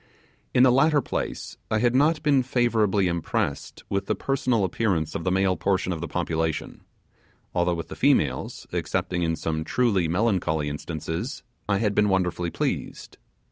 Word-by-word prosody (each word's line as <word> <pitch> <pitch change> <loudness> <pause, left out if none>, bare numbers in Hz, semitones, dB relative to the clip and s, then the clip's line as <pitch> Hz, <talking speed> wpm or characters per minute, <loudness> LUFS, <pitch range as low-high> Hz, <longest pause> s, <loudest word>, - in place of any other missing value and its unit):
In 125 - +5
the 130 - +6
latter 145 +4 +4
place, 130 - -4
I 110 - +1
had 120 +2 +2
not 150 +4 +3
been 145 -3 +4
favourably 115 -6 +2
impressed 85 -2 -2
with 100 0 -2
the - - +1
personal 130 -5 0
appearance 90 -5 0
of - - -4
the 90 - +1
male 95 0 +2
portion 95 -1 0
of 80 - -5
the 85 - -3
population; 80 -3 -2 0.7
although 85 0 +1
with 85 - -6
the - - -7
females, 75 - +1
excepting 90 -1 -1
in 80 -1 +1
some 80 0 -2
truly 100 -3 +1
melancholy 85 -5 0
instances, 80 - -5 0.3
I 100 - +3
had 105 -1 +1
been 105 0 +3
wonderfully 90 -2 0
pleased. - - -4
95 Hz, 160 wpm, -25 LUFS, 85-120 Hz, 0.7 s, the